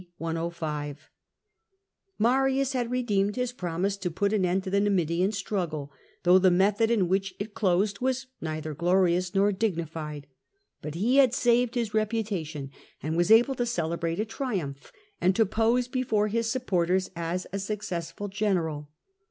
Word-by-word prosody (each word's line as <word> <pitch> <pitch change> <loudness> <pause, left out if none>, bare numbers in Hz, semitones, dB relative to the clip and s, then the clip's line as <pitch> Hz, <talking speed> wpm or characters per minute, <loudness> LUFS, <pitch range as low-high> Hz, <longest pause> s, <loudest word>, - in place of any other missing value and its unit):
105], 160 -3 -4 1.1
Marius 270 +3 +2
had 245 -2 -1
redeemed 210 -5 0
his 250 -1 -1
promise 180 -1 -2
to 185 -2 -2
put 200 +5 0
an 205 -3 +2
end 180 +1 +1
to 190 - -5
the 200 - +3
Numidian 185 -2 +1
struggle, 175 -8 -3 0.3
though 180 +1 +6
the 185 0 +5
method 200 +5 +3
in 210 -6 +2
which 190 +1 0
it 205 +1 -6
closed 195 +1 +1
was 260 +1 0 0.2
neither 155 -1 -4
glorious 180 +2 +2
nor 200 +1 +4
dignified. 165 -7 -3 0.6
But 150 0 -6
he 230 +10 +2
had 260 -3 +5
saved 240 0 +2
his 230 -4 -1
reputation, 200 -10 -2 0.3
and 155 +1 -2
was 175 +3 +2
able 235 +5 +6
to 245 -2 -1
celebrate 170 -4 -2
a 215 - +1
triumph, 200 - -4 0.3
and 185 +1 +3
to 225 - +4
pose 225 +4 +1
before 230 -5 0
his 230 +1 0
supporters 185 -7 0
as 170 +2 -3
a 200 - -1
successful 195 -2 -4
general. 175 -8 -1
195 Hz, 150 wpm, -27 LUFS, 170-225 Hz, 1.1 s, though